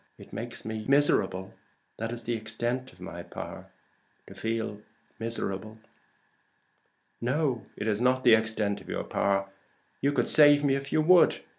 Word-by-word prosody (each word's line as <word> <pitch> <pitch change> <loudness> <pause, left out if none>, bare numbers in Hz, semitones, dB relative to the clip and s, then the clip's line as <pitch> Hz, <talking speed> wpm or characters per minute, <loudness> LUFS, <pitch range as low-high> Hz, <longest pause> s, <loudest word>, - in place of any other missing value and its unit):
It - - -14
makes - - -6
me 110 -1 -4
miserable. 135 -9 +2 0.4
That 115 +1 -3
is 120 -1 -3
the 120 - -2
extent 120 +3 -3
of 90 - -22
my 85 -1 -7
power - - -8 0.6
to - - -12
feel 110 -2 -3 0.4
miserable." 110 -2 -4 1.4
"No, 130 -1 0 0.2
it 105 - -4
is 105 0 0
not 130 +1 +2
the 120 - +7
extent 110 -2 +1
of - - -14
your - - -2
power. 100 0 0 0.5
You 140 - +2
could 125 -4 +1
save 145 -1 +6
me 140 -2 +3
if 140 0 -3
you 155 - +3
would. 175 +3 +5
115 Hz, 155 wpm, -28 LUFS, 105-135 Hz, 1.4 s, the